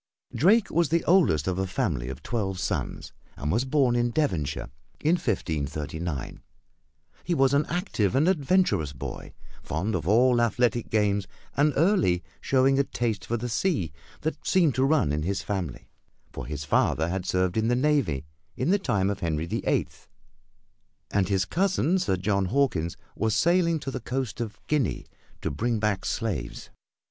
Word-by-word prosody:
Drake 205 +7 +4
was 170 -1 +2
the 165 +2 +2
oldest 155 - +3
of 95 0 0
a 95 - 0
family - - -1
of 65 - -7
twelve 95 -6 -2
sons - - -3 0.2
and 75 +2 -2
was 115 +6 +1
born 130 -3 +2
in 120 0 +2
Devonshire 90 - -1 0.3
in 155 - +2
1539. 80 - -3 0.8
He 175 - 0
was 135 -2 +3
an 145 +2 +2
active 155 - -1
and 145 +5 +3
adventurous 160 - +2
boy, 65 - -7 0.3
fond 90 +9 -2
of 85 -3 -2
all 120 +3 +4
athletic 120 0 +1
games 100 -3 +1 0.3
and 150 +2 +3
early 160 - +3 0.2
showing 135 +1 +3
a - - +5
taste 115 -6 -2
for 120 - -1
the 120 +2 -4
sea 120 - 0 0.3
that 160 - -3
seemed 170 -7 +3
to 130 +3 +2
run 140 - +3
in 75 +1 -1
his 95 +5 -2
family, 95 - -4 0.4
for - - -7
his 75 0 -4
father 80 +2 +2
had 95 +1 -2
served 90 0 0
in 110 0 +1
the 120 - +3
navy 125 - +1 0.3
in 140 +8 +1
the 205 - +3
time 100 - +1
of 100 - -4
Henry 80 -1 -1
the - - -3
Eighth, - - -1 1.0
and 100 -2 +1
his 95 -2 +2
cousin, 190 -1 +1
Sir 180 - +1
John 100 +1 +1
Hawkins, 90 - 0 0.2
was 110 -1 0
sailing 170 - +3
to 135 - -4
the - - -4
coast 125 0 -3
of 110 -3 -5
Guinea 150 -7 0 0.4
to - - -1
bring 115 - -1
back 105 -3 0
slaves. 95 - -3
110 Hz, 170 wpm, -26 LUFS, 90-145 Hz, 1.0 s, a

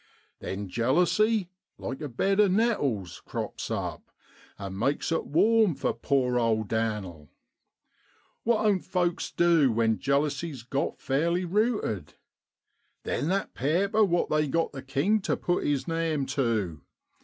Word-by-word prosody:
Then 100 +1 -5
jealousy, 180 - +2 0.3
like 135 +4 -5
abed 155 - 0
of 205 -3 +5
nettles, 145 - 0
crops - - -5
up, - - -4 0.5
and 95 -1 -6
makes 140 +7 0
it 165 - -1
warm 210 +2 +3
for 135 - -1
poor 125 -3 +1
old 110 -2 0
Dan'l. 105 -9 -3 1.1
What 225 -2 +1
oan't 200 -4 +2
folks 175 -2 -1
du 165 -6 +3
when 110 -1 +1
jealousy's 140 -1 -1
got 135 +3 -2
fairly 170 +7 0
ruted? 210 - -1 0.9
Then 145 - -2
that 195 +3 -1
paaper 195 - +2
what 175 -4 +1
they 150 0 +2
got 165 +4 0
the 135 - -7
king 145 +11 +1
tu - - 0
put 175 - -1
his 145 0 0
name 165 -4 0
tu. 110 - -1
145 Hz, 130 wpm, -27 LUFS, 115-180 Hz, 1.1 s, of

